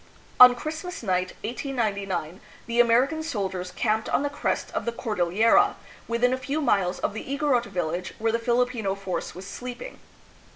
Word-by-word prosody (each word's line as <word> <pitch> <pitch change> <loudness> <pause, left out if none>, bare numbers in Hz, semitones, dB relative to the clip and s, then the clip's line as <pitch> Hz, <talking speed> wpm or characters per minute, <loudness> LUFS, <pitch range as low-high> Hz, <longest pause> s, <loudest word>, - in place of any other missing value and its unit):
On 250 0 +10
Christmas 315 +5 -6
night, 185 -2 0
1899, 200 - -3 0.3
the 235 0 -1
American 245 +7 +4
soldiers 190 - -3
camped 220 +1 0
on - - +1
the 285 - -1
crest 290 - -2
of - - -3
the 235 - 0
Cordil 215 -7 -1
lera, 230 - +4 0.3
within 235 +2 +2
a 260 - -2
few 280 +4 -2
miles 195 -11 +1
of - - -2
the 220 - -5
Igo 280 +2 -1
rot 245 -2 +3
village 175 0 -3
where 225 +1 0
the 230 - 0
Filipino 235 -4 0
force 190 -4 -4
was 185 +2 -8
sleeping. 250 - -8
230 Hz, 170 wpm, -25 LUFS, 195-255 Hz, 0.3 s, On